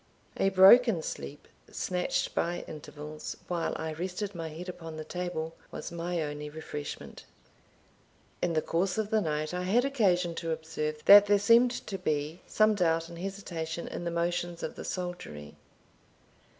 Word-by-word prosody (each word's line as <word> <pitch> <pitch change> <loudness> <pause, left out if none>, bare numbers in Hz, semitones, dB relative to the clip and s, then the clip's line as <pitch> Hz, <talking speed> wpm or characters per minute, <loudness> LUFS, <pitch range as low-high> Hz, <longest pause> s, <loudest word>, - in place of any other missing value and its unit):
A 195 - +3
broken 195 0 +7
sleep, 70 0 -6 0.2
snatched 180 -1 -1
by 175 +1 -1
intervals, 150 0 -7
while 170 -2 -1
I 160 -1 -3
rested 185 +5 -4
my 165 -2 -5
head 165 +4 -8
upon 165 -3 -7
the 155 - -5
table, 165 -1 -4 0.2
was - - -7
my 170 0 -2
only 150 0 -5
refreshment. 150 -1 -7 1.2
In 175 -1 +1
the 155 - +1
course 180 +3 0
of 215 0 -1
the 220 -1 +3
night 155 -1 -2
I 180 - -2
had 215 +8 +2
occasion 185 -10 +2
to 165 - -4
observe 155 -1 -3
that 205 0 +10
there 205 0 +5
seemed 235 +4 +4
to 195 -2 -5
be 155 0 -2
some 215 0 +4
doubt 165 -4 +1
and 170 0 -9
hesitation 170 -4 -4
in - - -5
the 170 - -1
motions 175 0 -2
of - - -3
the - - -8
soldiery. 175 - -5
175 Hz, 160 wpm, -30 LUFS, 160-190 Hz, 1.2 s, that